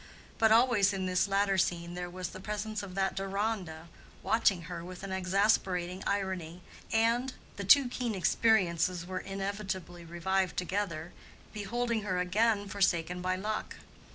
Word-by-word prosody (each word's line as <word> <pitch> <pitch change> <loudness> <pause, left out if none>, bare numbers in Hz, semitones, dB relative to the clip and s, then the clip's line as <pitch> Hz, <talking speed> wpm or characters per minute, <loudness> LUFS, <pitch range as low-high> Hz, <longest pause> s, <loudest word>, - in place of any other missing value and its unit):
But 220 -1 +5
always 220 -4 +5
in 190 -1 -2
this 185 +2 +2
latter 195 -1 +2
scene 170 -1 0
there 180 0 -4
was 180 -1 -5
the 185 - -9
presence 210 +2 -3
of 190 -2 -8
that 195 0 +1
Deronda, 195 -4 -3 0.4
watching 200 -6 +2
her 170 +1 -6
with 180 +1 -9
exasperating 190 -1 +1
irony, 185 -4 -2 0.3
and—the 230 -1 0
two 275 +6 +7
keen 245 -3 -3
experiences 180 -3 +2
were 185 0 -4
inevitably 195 -3 -4
revived 180 +2 -1
together—beholding 205 +5 -3
her 190 -3 -2
again 205 +3 +2
forsaken 180 -3 0
by 185 0 0
luck. 215 +3 -3
190 Hz, 130 wpm, -31 LUFS, 180-210 Hz, 0.4 s, two